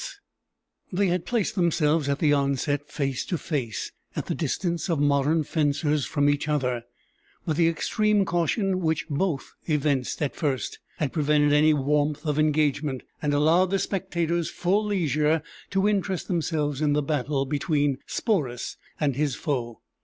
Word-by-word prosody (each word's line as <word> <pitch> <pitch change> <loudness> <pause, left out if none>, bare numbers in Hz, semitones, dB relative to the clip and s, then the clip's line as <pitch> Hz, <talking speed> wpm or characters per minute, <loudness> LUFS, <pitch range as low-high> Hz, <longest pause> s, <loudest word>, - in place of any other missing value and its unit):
] - - -57 0.3
They 195 +1 +2
had 180 0 -1
placed 235 -6 0
themselves 160 -4 +2
at 140 - +1
the 150 -2 +3
onset 140 +1 0
face 135 -3 -2
to 175 - -2
face, 125 - -3 0.2
at - - -3
the - - -2
distance 170 0 -2
of 165 -4 +1
modern 145 +2 +2
fencers 150 -1 0
from 145 -1 +1
each 145 +1 +1
other; 125 -6 0 0.6
but 155 - 0
the 165 +1 +4
extreme 210 +5 +1
caution 185 +3 0
which 160 -3 0
both 150 -1 -1
evinced 145 -4 0
at 145 - -2
first 140 -5 -2 0.2
had 145 -4 -2
prevented 150 -1 +3
any 150 +1 +5
warmth 150 +2 0
of 150 -1 0
engagement, 150 -3 +1 0.2
and 150 - 0
allowed 160 +6 +4
the 195 - +1
spectators 170 -4 -1
full 195 +4 +1
leisure 155 -5 +1 0.3
to 195 +1 +2
interest 195 -3 0
themselves 155 -5 -1
in 150 -1 +2
the 150 0 +1
battle 140 -1 0
between 145 -1 0
Sporus 145 - -1 0.2
and 145 -4 +1
his 145 -2 0
foe. 120 -6 -3
150 Hz, 155 wpm, -26 LUFS, 145-170 Hz, 0.6 s, any